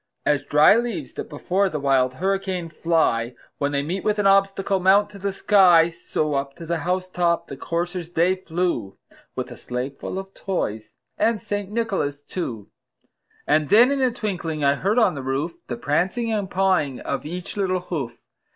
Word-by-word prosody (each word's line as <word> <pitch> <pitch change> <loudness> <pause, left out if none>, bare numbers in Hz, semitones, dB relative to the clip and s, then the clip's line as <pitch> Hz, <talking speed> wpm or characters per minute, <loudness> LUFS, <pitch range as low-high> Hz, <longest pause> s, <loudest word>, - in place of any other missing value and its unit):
As 145 -2 +2
dry 150 +6 +6
leaves 210 - -3
that - - -6
before 185 +6 0
the 150 - -3
wild 130 -2 +2
hurricane 190 0 -1
fly, 155 -8 +1 0.2
When 140 0 0
they 140 0 0
meet 180 +6 -3
with 210 0 +1
an 205 - 0
obstacle, 195 0 +3
mount 200 +3 +4
to 200 - -11
the 200 +1 -1
sky, 185 -4 +5
So, 155 -2 -2
up 140 0 -2
to 170 - -9
the 170 0 -1
house 185 +3 -1
top 175 -2 0
the 140 - -8
coursers 170 +3 -3
they 175 +2 +3
flew, 170 - -2 0.4
With - - -4
a - - -9
sleigh 125 +2 -4
full 140 +6 -6
of 195 0 -7
toys 110 - -4 0.2
and 225 -1 +2
St. 205 -1 -4
Nicholas 195 -11 -2
too. 120 - -5 0.7
And 150 -1 +2
then 235 +7 +6
in 280 -1 0
a 260 - +4
twinkling 180 -10 -3
I 140 0 +4
heard 195 - 0
on 230 - +4
the 140 - -5
roof, 135 +6 -2
The 120 - -4
prancing 185 - 0
and 205 -3 -2
pawing 185 -8 +1
of 135 -1 -3
each 175 +4 -6
little 185 -3 0
hoof. 135 -10 -5
175 Hz, 185 wpm, -23 LUFS, 145-195 Hz, 0.7 s, dry